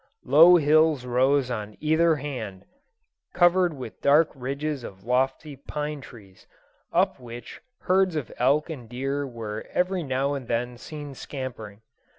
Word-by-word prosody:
Low 160 +7 +8
hills 155 -3 +3
rose 130 +1 +2
on 105 -2 -5
either 160 +1 +3
hand, 120 -10 -6 0.7
covered 175 -1 +4
with 125 -5 -9
dark 150 +3 +4
ridges 140 +1 -4
of 95 -3 -10
lofty 130 +5 0
pine 150 +2 -5
trees, 100 -8 -15 0.4
up - - +1
which 120 -1 -10 0.2
herds 185 -1 +2
of 150 -6 -3
elk 140 +5 +3
and 125 -7 -8
deer 135 +3 -2
were 110 -4 -6
every 180 0 0
now 135 -1 -1
and 135 -4 -5
then 120 +1 -2
seen 145 -1 -8
scampering. 120 -6 -7
135 Hz, 140 wpm, -25 LUFS, 120-150 Hz, 0.7 s, Low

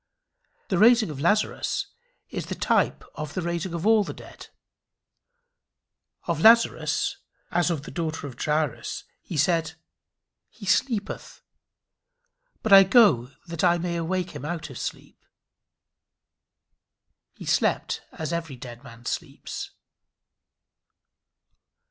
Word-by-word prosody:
The 185 - +1
raising 230 -4 +6
of 140 - -7
Lazarus 205 +7 +1 0.5
is - - -4
the - - -4
type - - +1
of 155 +1 -6
the 185 - -2
raising 170 +1 -2
of 170 +2 -4
all 220 -1 +5
the - - -7
dead. - - -12 1.8
Of 165 -2 -1
Lazarus, 230 +3 +4 0.3
as 175 0 +2
of 160 -5 -2
the - - -9
daughter 160 -3 -3
of 135 -4 -7
Jairus, 150 -3 -1 0.2
he 165 - -6
said 160 +1 +2 0.8
"he 205 - -12
sleepeth; 220 +1 -1 1.2
but 220 - +3
I 195 - +12
go 190 - +5 0.2
that 170 +2 -4
I 175 -1 +5
may 170 0 -2
awake 180 +2 -2
him - - -8
out 160 -1 -4
of 130 - -8
sleep." - - -7 2.1
He - - -10
slept - - +1
as 160 +1 -4
every 165 -5 -3
dead 120 0 -10
man 120 -2 -13
sleeps. - - -5
170 Hz, 120 wpm, -25 LUFS, 155-190 Hz, 2.1 s, I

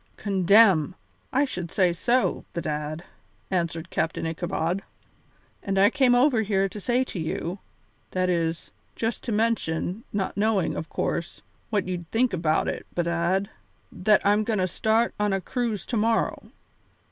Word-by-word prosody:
"Condemn! 195 -3 +4 0.4
I 275 +2 +3
should 180 -10 -5
say 180 -3 +3
so, 245 +8 +1
bedad," 155 0 -3 0.5
answered 170 -2 -2
Captain 165 - -1
Ichabod; 170 +2 -2 0.8
"and 195 -1 -2
I 200 +3 +5
came 255 -2 +4
over 245 -2 +4
here 195 -2 +1
to 210 - -8
say 245 +5 +1
to 210 - -6
you 170 +3 -3 0.5
that 185 0 0
is, 170 -2 -1 0.2
just 225 0 -2
to 235 - -2
mention, 215 -3 0
not 195 -2 -2
knowing, 205 -2 +1
of 160 - -5
course, 170 - -3 0.3
what 205 -4 0
you'd 175 -3 -4
think 235 -1 +1
about 160 -3 +1
it, - - -4
bedad 175 +3 0 0.4
that 210 +2 +2
I'm 205 +1 +4
goin' 215 0 -1
to 185 -1 +1
start 220 +6 +1
on 210 -1 +1
a 195 - +1
cruise 225 +1 -2
to 240 - -2
morrow. 225 +1 0
195 Hz, 150 wpm, -25 LUFS, 170-220 Hz, 0.8 s, I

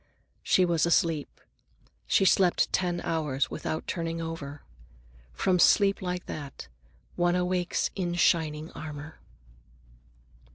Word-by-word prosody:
She 185 - +3
was 170 -1 +1
asleep. 165 -3 +1 0.7
She 195 - +3
slept 185 -1 +3
ten 175 -1 0
hours 150 -6 -1
without 155 0 -4
turning 165 -1 -3
over. 160 -3 -6 0.7
From 180 - +1
sleep 200 +2 +4
like 180 -1 -3
that, 140 - -7 0.5
one 175 0 +2
awakes 180 0 0
in 175 -3 -2
shining 160 -3 +1
armor. 155 0 -8
165 Hz, 110 wpm, -28 LUFS, 155-180 Hz, 0.7 s, sleep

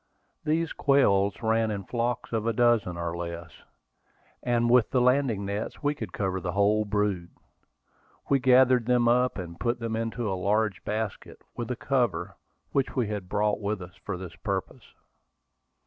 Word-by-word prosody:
These 160 +1 0
quails 100 -7 +2
ran 110 0 +2
in 100 -2 -3
flocks 120 +3 -2
of 110 0 -1
a 115 - +2
dozen 115 -6 +2
or 85 0 -3
less, 85 -1 -6 0.9
and 120 -1 +1
with 120 -1 +4
the 130 - +2
landing 125 -5 +2
nets 100 +7 -4
we 145 0 +2
could 110 -10 -7
cover 95 -1 -2
the 90 -2 -3
whole 105 +2 +3
brood. 100 -4 -1 1.0
We 140 - +3
gathered 125 -2 +5
them 125 -1 +3
up, 125 +2 +3
and 85 -3 -7
put 120 0 0
them 115 -1 -3
into 115 +1 -2
a 95 - -1
large 100 +2 0
basket, 110 0 -4
with 120 0 -4
a 125 - -1
cover, 120 -9 -1 0.4
which 135 -1 0
we 120 -5 0
had 100 -4 -5
brought 105 +1 +1
with 105 0 -2
us 90 -1 -10
for 100 -3 -4
the 90 -2 -7
purpose. - - -4
110 Hz, 165 wpm, -27 LUFS, 100-120 Hz, 1.0 s, gathered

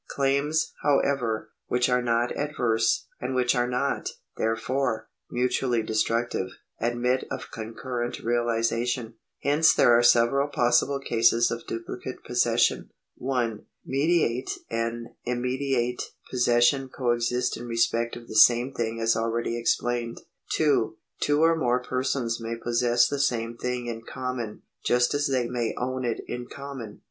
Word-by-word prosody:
Claims, 140 +4 +1
however, 125 -7 +1 0.2
which 125 0 +2
are 125 -1 +2
not 120 0 0
adverse, 120 -6 +1
and 130 +1 -3
which 125 -1 +3
are 120 0 +1
not, 125 +3 -1 0.3
there 115 0 0
fore, 120 -1 -2 0.2
mutually 125 -1 0
destructive, 110 -2 0 0.3
admit 120 +2 0
of - - -6
concurrent 120 +2 -4
realisation. 120 0 0 0.3
Hence 150 +3 +4
there 120 - +6
are 120 - +5
several 120 +4 +4
possible 140 +1 +2
cases 115 -2 +3
of 115 0 -5
duplicate 120 +3 -6
possession. 120 -1 +2 0.3
1. 120 -5 -2 0.2
Mediate 135 -3 +1 0.2
and 115 +1 -2
immediate 125 0 -1 0.3
possession 125 +2 +3
coexist 125 0 0
in 120 - -7
respect 115 0 0
of 120 -1 -10
the - - -8
same 120 +4 +6
thing 115 -2 -2
as 115 0 +2
already 115 +1 -1
explained. 120 0 -1 0.3
2. 140 -8 +2 0.2
Two 145 +2 +2
or 165 0 +5
more 125 -5 +1
persons 125 -2 -2
may 115 +1 -3
possess 120 +1 +2
the 140 - -3
same 120 -4 0
thing 125 +1 -3
in 115 -1 -4
common, 125 -2 -5 0.2
just 120 0 +2
as 145 0 +1
they 130 -3 +1
may 120 -2 -2
own 130 +1 -2
it 120 -2 -1
in 120 0 -5
common. 135 -7 -8
120 Hz, 135 wpm, -26 LUFS, 115-130 Hz, 0.3 s, there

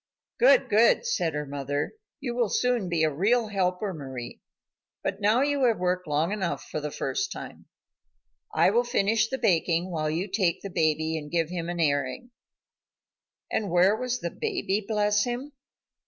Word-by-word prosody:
"Good, - - +5
good," 225 - +4
said 170 - 0
her 150 0 -2
mother, 145 0 -3 0.3
"you 260 -5 -3
will 240 -3 +1
soon 245 -6 +1
be 165 -2 +1
a 155 -2 +2
real 215 - +2
helper, 190 0 -1
Mari. 130 -6 -7 0.6
But - - -3
now 215 +6 +4
you 285 -2 +1
have 230 -3 +3
worked 180 0 -1
long 155 +4 +1
enough 195 -4 -2
for 155 - -4
the 150 - -3
first 395 - -2
time. - - -9 0.8
I 430 - +4
will 235 +3 +3
finish 220 -2 +1
the 265 - -2
baking 175 -3 +1
while 155 -2 -1
you 170 +6 -2
take 185 -3 0
the 200 - -6
baby 160 0 +1
and 150 -1 -9
give 165 -1 0
him 170 -1 -3
an 175 0 -4
airing." 145 - 0 1.2
And 210 -3 -1
where 180 +4 +4
was 250 +1 -3
the 170 - -3
baby, 365 - -1
bless 210 -1 +2
him? 250 +4 -4
190 Hz, 170 wpm, -27 LUFS, 160-235 Hz, 1.2 s, Good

